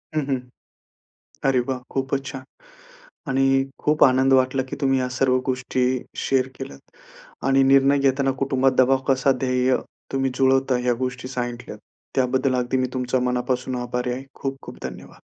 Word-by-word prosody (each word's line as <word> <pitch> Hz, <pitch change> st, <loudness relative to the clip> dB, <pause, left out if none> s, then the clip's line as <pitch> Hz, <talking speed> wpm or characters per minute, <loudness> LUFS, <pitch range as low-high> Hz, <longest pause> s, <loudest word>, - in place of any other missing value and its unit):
हं, 155 Hz, -, +2 dB
हं. 135 Hz, -2 st, -1 dB, 1.1 s
अरे 130 Hz, -2 st, +3 dB
वाह! 130 Hz, -1 st, -2 dB
खूपच 135 Hz, 0 st, -2 dB
छान. 135 Hz, -1 st, -6 dB, 0.8 s
आणि 135 Hz, 0 st, +2 dB, 0.4 s
खूप 150 Hz, 0 st, +4 dB
आनंद 130 Hz, 0 st, +4 dB
वाटला 130 Hz, 0 st, +3 dB
की -, -, -4 dB
तुम्ही 135 Hz, -1 st, +2 dB
ह्या 125 Hz, -, -1 dB
सर्व 130 Hz, -1 st, +3 dB
गोष्टी 130 Hz, 0 st, -1 dB, 0.4 s
शेअर 130 Hz, -1 st, +2 dB
केल्यात 100 Hz, -, -10 dB, 0.5 s
आणि 135 Hz, 0 st, +4 dB
निर्णय 140 Hz, +1 st, +5 dB
घेताना 135 Hz, 0 st, +2 dB
कुटुंबात 135 Hz, -1 st, +2 dB
दबाव 130 Hz, +1 st, +5 dB
कसा 135 Hz, 0 st, +3 dB
ध्येय, 125 Hz, 0 st, +2 dB, 0.4 s
तुम्ही 135 Hz, -1 st, 0 dB
जुळवता 135 Hz, 0 st, +3 dB
ह्या 125 Hz, -1 st, +2 dB
गोष्टी 125 Hz, 0 st, -4 dB
सांगितल्यात. 120 Hz, -2 st, -5 dB, 0.4 s
त्याबद्दल 130 Hz, 0 st, +1 dB
अगदी 125 Hz, +1 st, 0 dB
मी 130 Hz, 0 st, +1 dB
तुमच्या 125 Hz, 0 st, 0 dB
मनापासून 125 Hz, +1 st, -1 dB
आभारी 125 Hz, 0 st, -2 dB
आहे. 130 Hz, +2 st, -6 dB, 0.2 s
खूप 135 Hz, 0 st, -3 dB
खूप -, -, -10 dB
धन्यवाद. -, -, -8 dB
130 Hz, 155 wpm, -23 LUFS, 125-135 Hz, 1.1 s, निर्णय